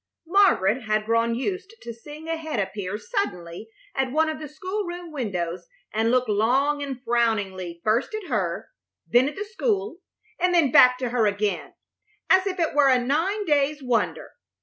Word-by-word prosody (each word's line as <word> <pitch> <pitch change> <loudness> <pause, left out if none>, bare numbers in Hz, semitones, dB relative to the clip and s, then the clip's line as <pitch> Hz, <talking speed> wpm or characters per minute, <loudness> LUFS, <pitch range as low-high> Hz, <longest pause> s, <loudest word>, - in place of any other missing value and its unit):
Margaret 270 - +3
had 215 0 0
grown 230 +1 +1
used 380 - -4
to 235 - -6
seeing 295 +7 -11
a 330 - -1
head 315 -7 -4
appear 195 0 -3
suddenly 215 - -4 0.2
at 265 -1 -1
one 315 +3 +2
of 310 -1 -4
the 305 - -6
school 380 +7 -4
room 350 -2 -7
windows 180 - -3 0.3
and 220 +1 +1
look 250 0 +2
long 260 +8 +2
and 275 -3 -4
frowningly 205 -8 -1
first 230 - +1
at 430 -4 -6
her, 195 - -2 0.4
then 245 +10 +4
at 295 - -11
the 410 - -4
school, 420 -4 -2 0.4
and 360 0 +2
then 310 -7 +4
back 250 0 +7
to 250 -1 -2
her 230 -3 +2
again, 205 0 -2 0.6
as 375 +1 +5
if 380 -1 -2
it 330 -3 0
were 290 -2 +5
a 260 - +5
nine 325 - 0
days' 295 -2 +1
wonder. 245 -3 -1
260 Hz, 175 wpm, -24 LUFS, 220-330 Hz, 0.6 s, back